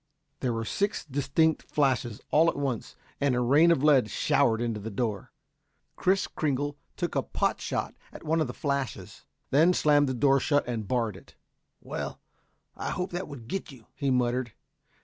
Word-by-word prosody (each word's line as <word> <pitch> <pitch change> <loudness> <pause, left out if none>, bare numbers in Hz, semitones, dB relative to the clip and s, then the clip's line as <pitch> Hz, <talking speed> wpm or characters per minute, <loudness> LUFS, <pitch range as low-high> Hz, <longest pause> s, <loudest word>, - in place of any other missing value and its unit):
There 125 - 0
were 115 -1 -2
six 200 - -1
distinct 145 +3 +1
flashes 125 -6 0
all 160 +3 +5
at - - -3
once 135 -5 -3 0.2
and 140 -3 +2
a - - +1
rain 140 +7 +5
of 165 -5 +3
lead 135 -7 +5
showered 115 0 +2
into 115 -2 -2
the 110 +2 -5
door. 105 -2 -3 0.6
Kris 190 +1 +2
Kringle 145 -1 -2 0.2
took - - -2
a - - +1
pot - - -1
shot - - -2 0.2
at - - -11
one 160 +1 +1
of 155 - +1
the 125 - -5
flashes, 140 - -3 0.3
then 160 +6 +5
slammed 145 -2 +4
the 130 - -1
door 135 +2 +4
shut 145 +1 +1
and 115 -4 -3
barred 115 -4 0
it. - - -18 0.5
"Well; - - -5 0.6
I - - -4
hope 180 +1 -3
that 175 +1 -4
would 130 -6 -10
get 190 +1 -4
you," 125 -5 -15
he 140 -2 -2
muttered. 125 -2 0
135 Hz, 180 wpm, -28 LUFS, 120-150 Hz, 0.6 s, all